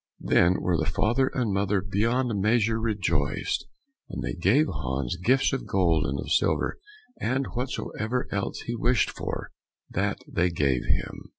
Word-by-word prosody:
Then 85 +2 +4
were 90 -2 +1
the 80 +1 0
father 120 +9 +2
and 120 -7 -1
mother 100 +1 +1
beyond 110 +3 0
measure 110 +1 +2
rejoiced, 95 -10 -1 0.4
and - - -5
they - - -2
gave 105 - +3
Hans 65 - -2
gifts 130 +6 +3
of 135 - -3
gold 85 -6 +2
and 70 0 -2
of - - -5
silver, - - +1 0.4
and 130 +3 0
whatsoever 125 -1 -2
else 100 -1 -2
he 120 - -4
wished 120 +2 +2
for, - - -5 0.4
that - - 0
they 90 +1 +1
gave 70 -7 +1
him. - - -2
100 Hz, 155 wpm, -27 LUFS, 85-120 Hz, 0.4 s, Then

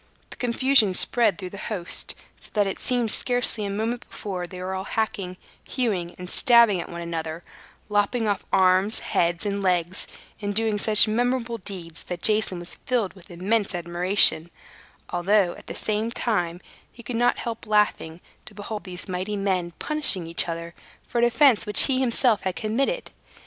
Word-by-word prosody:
The - - -9
confusion 245 -4 +2
spread 235 0 +2
through 185 -3 -7
the 200 - -9
host, 185 -6 -4 0.2
so - - -3
that 205 -1 +3
it 195 - -4
seemed 245 -3 +1
scarcely 245 -4 +2
a - - -3
moment 225 +4 -3
before 185 -4 -5
they 180 +1 -10
were 185 +1 -4
all 190 0 -4
hacking, 195 -5 -3 0.3
hewing, 195 -9 -2
and 180 - -8
stabbing 235 -2 +4
at - - -9
one 170 0 -7
another, 165 -1 -5 0.4
lopping 210 +2 0
off 205 -1 -1
arms, 190 +3 +3
heads, 170 +2 -1
and 200 0 -2
legs 180 -1 -1 0.3
and 205 -1 -3
doing 220 -1 +1
such 215 +1 +6
memorable 240 +1 -1
deeds 180 -4 -9
that 175 -1 -6
Jason 210 -4 +2
was 175 0 -9
filled 235 -7 -1
with 185 -3 -18
immense 195 +3 -1
admiration; 175 -1 +4 0.6
although, 180 +1 +2
at - - -15
the - - -6
same 215 +1 0
time, 175 -8 -2 0.3
he 235 - -14
could 245 - -5
not 240 +1 +2
help 230 -1 -6
laughing 210 -6 0 0.2
to - - -12
behold 210 0 -7
these 180 -1 -8
mighty 185 +3 -3
men 190 -3 -1
punishing 300 - +2
each 165 +1 0
other 170 0 -6 0.3
for 240 - -2
an 235 - +4
offense 240 -2 +3
which 210 - +6
he 260 -2 +1
himself 240 -3 +2
had 185 -1 -3
committed. 270 - -2
205 Hz, 175 wpm, -24 LUFS, 180-230 Hz, 0.6 s, such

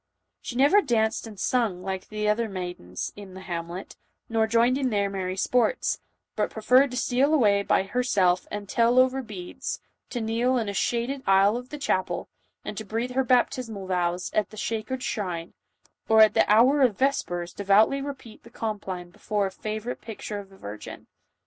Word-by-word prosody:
She 240 - -6
never 285 +11 +5
danced 225 - 0
and 210 -3 -11
sung 210 -6 0
like 190 0 -4
the 215 0 -2
other 220 +2 +1
maidens 175 - -5
in 195 -2 -11
the 190 - -8
hamlet, 175 0 -6 0.3
nor 225 -1 +2
joined 235 +4 +3
in 265 -2 +1
their 200 -3 0
merry 185 -1 -3
sports, 250 - +1 0.4
but - - 0
prefer 235 +4 +4
red 280 +1 +3
to 250 - -5
steal 260 +4 +2
away 205 -7 +4
by 200 - +2
herself 195 -5 +1
and 205 -1 -5
tell 235 +3 +2
over 260 +1 +4
beads, 200 -7 -6 0.3
to 245 - -3
kneel 235 +3 +1
in 225 -3 -1
a 200 - -2
shaded 240 +6 -1
aisle 195 +2 +5
of 250 +1 -6
the 300 - -6
chapel, 185 -10 -1 0.4
and 210 0 -5
breathe 230 +4 -2
her 265 +1 +1
baptis 250 -1 +2
mal 200 -3 -6
vows, 180 -1 -1
at 215 - +1
the 215 - -13
sacred 230 +4 -3
shrine, 180 -6 -3 0.6
or 220 0 +7
at 215 - +7
the - - +3
hour 255 +7 +5
of 245 -7 +3
ves 275 +1 +2
pers 175 0 -5
devoutly 205 +7 +3
repeat 275 -5 -8
the 235 - -15
compline 195 -6 -5
before 205 +2 -1
a 190 - -3
favorite 215 +4 -5
picture 215 -2 -6
of 200 -1 -11
the 195 - -17
virgin. 105 - -9
215 Hz, 185 wpm, -26 LUFS, 190-245 Hz, 0.6 s, or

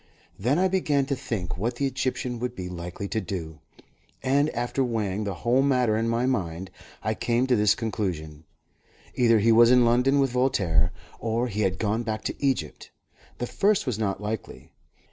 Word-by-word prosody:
Then 125 +9 +1
I 185 +1 +3
began 150 -7 +1
to 140 0 -1
think 110 -10 -4
what 120 +4 -1
the 140 - -1
Egyptian 130 -2 -2
would 125 +1 -3
be 90 -1 -5
likely 90 +2 -6
to 110 - -1
do, 80 -5 -6 0.6
and 140 +3 +2
after 120 +2 -1
weighing 105 -4 -1
the 100 -2 -3
whole 120 +6 +2
matter 125 -5 +2
in 115 +1 0
my 115 +2 +1
mind 95 -8 -2 0.3
I - - 0
came 120 +1 0
to 130 -1 +3
this 105 -2 +4
conclusion: 85 -9 -4 0.7
either 115 -2 +4
he 110 +2 +4
was 115 +1 +7
in 125 -1 +6
London 125 +4 +3
with 135 -2 +2
Voltaire, 95 -10 +2 0.3
or 115 +2 -1
he 105 0 -2
had 95 -2 +1
gone 110 +1 0
back 110 -2 -3
to - - -5
Egypt. 130 - -1 0.5
The 120 - -2
first 200 - +1
was 120 -5 -2
not 100 -3 -1
likely. 105 +2 -6
115 Hz, 185 wpm, -26 LUFS, 100-125 Hz, 0.7 s, was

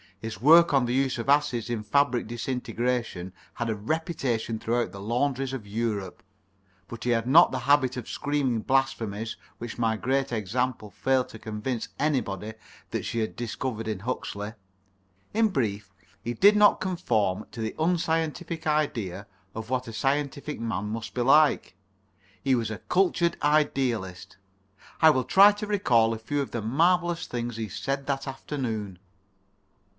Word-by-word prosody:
His 110 -3 -6
work 165 +5 +7
on 135 -3 +4
the 120 - -1
use 135 0 +1
of 115 +3 -4
acids 125 -5 +2
in 120 -3 -2
fabric 140 +1 +1
disintegration 120 -5 -3 0.2
has 120 -1 -2
a 110 - 0
reputation 120 -2 -2
throughout 115 -2 -1
the 100 - -9
laundries 130 +4 -1
of 125 -6 -5
Europe. 105 -3 -3 0.7
But 120 -2 -8
he 125 - -1
had 115 0 +1
not 165 +7 +7
the - - -3
habit 130 -3 +4
of 125 - -6
screaming 140 -6 -1
blasphemies 115 -5 -1 0.2
which 120 -1 -6
my 115 -2 +1
Great 135 +6 0
Example 115 +1 -2
failed 130 +6 0
to 110 - -11
convince 110 +2 -4
anybody 110 -8 -1 0.4
that - - -2
she 115 - -2
had 110 - -2
discovered 120 -1 -4
in 110 -3 -2
Huxley. 105 -2 -4 0.8
In 220 0 +3
brief, 105 - -2 0.3
he 120 - -2
did 200 - +6
not 210 0 +5
conform 110 - 0
to 115 - -7
the 110 - -3
unscientific 165 0 -1
idea 120 - -1 0.3
of 110 +1 -6
what 130 -1 -1
a 115 - -7
scientific 140 +4 -1
man 110 -4 -2
must 110 +2 -5
be 125 - 0
like. 145 - +4 0.7
He 135 -1 +3
was 115 -3 -1
a 110 - -5
cultured 175 -2 +1
idealist. 130 -11 0 0.6
I 160 -1 +7
will 130 -3 +1
try 195 - +7
to 210 +1 -6
recall 120 - +3
a 110 - -5
few 145 +6 -2
of 140 - -5
the 120 - -3
marvellous 170 - +2
things 120 -1 -4
he 110 -2 -4
said 135 +7 -3
that 135 -1 -2
afternoon. 115 -8 -4
125 Hz, 160 wpm, -27 LUFS, 110-145 Hz, 0.8 s, work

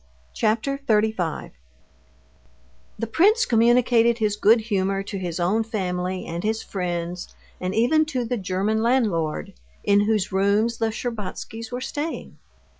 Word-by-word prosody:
Chapter 230 +5 0
35 215 - 0 1.5
The - - -2
prince 410 - +3
communicated 235 0 +4
his 215 -3 0
good 220 +2 +4
humor 195 -3 -1
to 195 0 -5
his 175 -2 -4
own 195 +6 +2
family 185 -4 -3
and 170 +1 -5
his 220 +1 -1
friends, 175 -2 -4 0.2
and 185 +1 -3
even 280 +8 +3
to 260 -6 -2
the 245 - -1
German 195 +3 -1
landlord 215 -11 0 0.3
in 205 0 +4
whose 215 -3 0
rooms 200 +4 +1
the 225 - +2
Shtcherbatskys 225 0 -5
were 250 +1 -4
staying. 295 +5 -5
220 Hz, 130 wpm, -24 LUFS, 190-235 Hz, 1.5 s, communicated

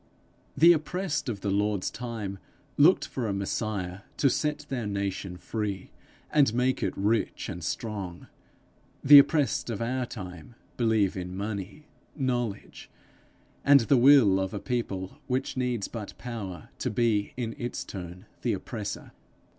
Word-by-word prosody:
The 170 +2 +8
oppressed 165 -1 -2
of 100 -4 -4
the 100 - -1
Lord's 100 -1 0
time 110 -5 -5 0.4
looked 165 +6 +5
for 125 -4 -3
a 100 - -1
Messiah 100 -2 -3 0.2
to 140 - +3
set 150 +1 -1
their 125 -6 -3
nation 100 -2 -3
free, 100 0 -4 0.4
and 140 -7 +4
make 125 +1 +1
it - - -2
rich 105 +3 0
and 90 -5 -6
strong; 95 -1 -4 0.8
the 145 +1 +11
oppressed 140 -5 +2
of 110 -4 -3
our 125 +2 -1
time 90 0 -9 0.2
believe 110 -5 +2
in 90 0 -5
money, 105 +7 -5 0.3
knowledge, 120 -6 -3 0.7
and 140 -1 +7
the 125 +5 +3
will 125 -7 +6
of 95 +2 -2
a - - -2
people 100 -3 -3
which 130 0 -1
needs 125 -5 -1
but 110 -4 -7
power 100 -9 -6
to - - -1
be 110 -2 +1
in 115 -3 -3
its 120 0 -3
turn 90 0 -8 0.2
the - - +1
oppressor. - - -5
110 Hz, 145 wpm, -28 LUFS, 100-130 Hz, 0.8 s, the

